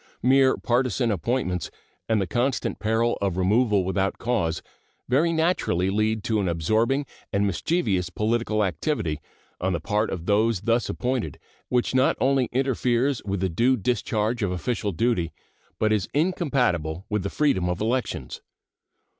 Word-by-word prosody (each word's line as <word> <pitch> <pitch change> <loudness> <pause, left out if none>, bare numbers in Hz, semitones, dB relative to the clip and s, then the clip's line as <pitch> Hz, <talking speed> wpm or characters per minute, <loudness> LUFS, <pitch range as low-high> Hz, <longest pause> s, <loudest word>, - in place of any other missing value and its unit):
Mere 130 +1 +4
partisan 125 -1 +1
appointments 90 - -1 0.4
and 110 -1 +3
the 95 - 0
constant 125 +7 -1
peril 115 +2 +1
of 95 -3 0
removal 105 +2 +3
without 95 +1 -1
cause 105 -10 -1 0.4
very 150 +7 +3
naturally 160 - +1
lead 110 +1 0
to 110 -2 0
an 100 - 0
absorbing 110 - +1 0.3
and 100 0 +1
mischievous 95 - 0
political 110 +1 0
activity 95 - -2 0.4
on 95 +1 0
the 85 - -1
part 105 +5 0
of 85 -3 -5
those 105 0 +2
thus 115 +2 +1
appointed, 125 - -2 0.3
which 125 0 +1
not 130 +1 +3
only 135 -2 +2
interferes 130 0 +1
with 100 -2 -2
the 95 - +2
due 120 +10 +2
discharge 115 +1 -1
of 100 -3 0
official 100 +4 -2
duty, 90 -3 0 0.5
but 110 0 +2
is 105 -4 -1
incompatible 125 - 0
with 105 -2 -1
the 100 - -3
freedom 95 -13 +1
of 90 - -2
elections. 120 +4 -2
110 Hz, 145 wpm, -25 LUFS, 95-125 Hz, 0.5 s, Mere